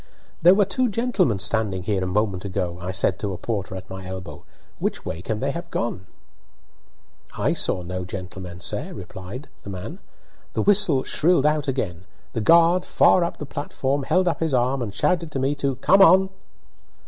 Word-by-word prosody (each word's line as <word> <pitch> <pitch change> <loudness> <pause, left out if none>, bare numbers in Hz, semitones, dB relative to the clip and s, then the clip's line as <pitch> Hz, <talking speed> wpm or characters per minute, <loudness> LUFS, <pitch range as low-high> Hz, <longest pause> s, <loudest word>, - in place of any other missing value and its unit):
"There 180 +3 +7
were 205 0 +4
two 250 +6 0
gentlemen 210 - +1
standing 100 -2 0
here 95 -1 -1
a - - -2
moment 95 -1 0
ago," 90 -3 -3
I 90 - -5
said 95 0 +1
to 100 -2 -3
a - - -5
porter 100 -4 -4
at 95 0 -8
my 95 -1 -8
elbow; 95 -1 -8 0.3
"which - - -2
way 80 - -4
can 110 +3 -3
they 135 +1 0
have 170 +3 -6
gone?" 95 - -3 1.3
"I - - +1
saw 90 - 0
no 90 +1 -4
gentlemen, 90 -1 -8
sir," - - -2
replied 100 +10 -8
the - - -9
man. 100 - -7 0.5
The - - 0
whistle 190 -10 +4
shrilled 160 -3 +2
out 150 -1 +1
again. 95 -10 -3 0.3
The 115 - -1
guard, 170 +7 +5
far 180 - +4
up 170 - -3
the 150 - -6
platform, 140 0 -2
held 180 +7 +1
up 170 - 0
his 160 -4 0
arm, 125 +2 +1
and 115 -4 -3
shouted 170 - 0
to 135 - -1
me 135 +2 +1
to 140 -2 -1
"come 195 +9 +4
on!" 190 +1 +7
125 Hz, 185 wpm, -23 LUFS, -, 1.3 s, There